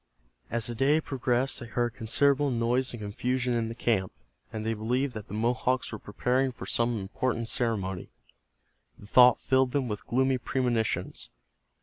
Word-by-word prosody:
As 115 -2 0
the 120 - -1
day 135 +6 +3
progressed 130 -2 0
they 120 - -8
heard 120 0 -1
considerable 140 +4 +2
noise 125 +2 0
and 120 - -7
confusion 125 +4 -1
in 115 -1 0
the 115 - -6
camp, 110 -6 0 0.4
and 110 -1 -5
they 115 - 0
believed 125 +5 -1
that 110 -2 -7
the - - -6
Mohawks 125 +3 0
were 110 - -6
preparing 125 +6 0
for - - -9
some 120 -1 +2
important 115 +4 -2
ceremony. 100 -7 -2 0.9
The - - -14
thought 125 +3 +6
filled 130 -1 +2
them 140 -3 0
with 105 -2 -5
gloomy 130 +1 +2
premonitions. 120 -3 -1
120 Hz, 160 wpm, -28 LUFS, 110-130 Hz, 0.9 s, thought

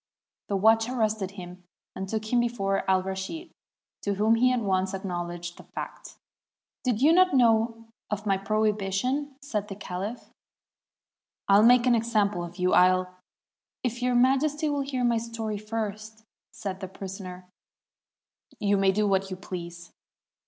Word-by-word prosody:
The 200 - -1
watch 225 +3 +4
arrested 215 -5 0
him, 180 -2 -10 0.3
and 190 0 -5
took 220 +2 -3
him 245 - +5
before 200 -5 0
Alraschid, 190 - -1 0.5
to 200 -1 -1
whom 215 +3 +3
he 250 +2 +4
at 250 -2 +1
once 190 -1 0
acknowledged 175 -2 -5
the - - -12
fact. - - -7 0.7
"Did 245 -1 0
you 315 +3 +6
not 365 -3 +5
know 230 -2 +3 0.2
of 210 0 -3
my 195 -2 +3
prohibition?" 215 +7 0
said 210 -7 -3
the 195 - -6
caUph. 200 +4 -6 1.2
"I'll 200 +1 +6
make 240 +2 +6
an 250 - +4
example 215 -5 +1
of 175 +1 -9
you; 180 0 +1
I'll 185 0 +4 0.2
— - - -68
" - - -67
"If 245 -1 -2
Your 250 0 +1
Majesty 285 +5 +2
will 285 -1 0
hear 270 -2 -2
my 235 -1 +3
story 225 -2 -4
first," 215 0 -5 0.3
said 190 -2 -5
the 190 - -5
prisoner, 185 -1 -8 1.1
"you 205 -1 +2
may 195 0 +4
do 210 +2 +1
what 195 -1 +1
you 185 - -5
please." 175 -2 -8
210 Hz, 155 wpm, -27 LUFS, 190-235 Hz, 1.2 s, you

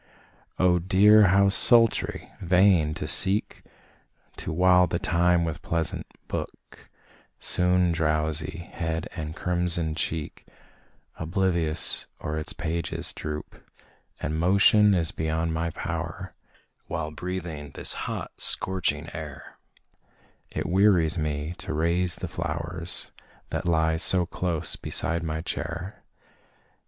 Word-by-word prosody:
Oh 90 -1 +3
dear! 105 +4 +5
how 100 +1 +4
sultry! 115 +3 +3
vain 90 -4 +3
to 75 - -4
seek 95 +5 +3 0.8
To - - -5
while 90 +2 +4
the 85 - -1
time 85 0 +2
with 80 -2 -4
pleasant 85 -1 -2 0.2
book, - - -7 0.5
Soon 90 -1 +2
drowsy 80 +1 -1
head 80 -2 -3
and 80 -2 -5
crimsoned 85 -3 -1
cheek 80 -2 -4 0.7
Oblivious 85 -2 +1
o'er 75 0 -3
its 75 - -4
pages 85 +1 -2
droop 75 0 -7 0.6
And 80 +2 -3
motion 100 +3 +5
is 85 -3 0
beyond 80 +1 -2
my 85 +1 -1
power, - - -5 0.5
While 80 -2 -4
breathing 85 -3 -6
this - - -1 0.2
hot, - - -5
scorching 95 -2 +1
air, - - -9 0.9
It - - -4
wearies 90 -3 +3
me 75 +1 -3
to 80 - -5
raise 85 +2 +1
the - - -6
flowers, 80 +2 -3 0.4
That - - -3
lie 80 -1 +2
so 90 +1 +4
close 85 -2 -2
beside 85 +1 -1
my 80 -1 -3
chair. 85 +3 -5
85 Hz, 115 wpm, -26 LUFS, 80-90 Hz, 0.9 s, dear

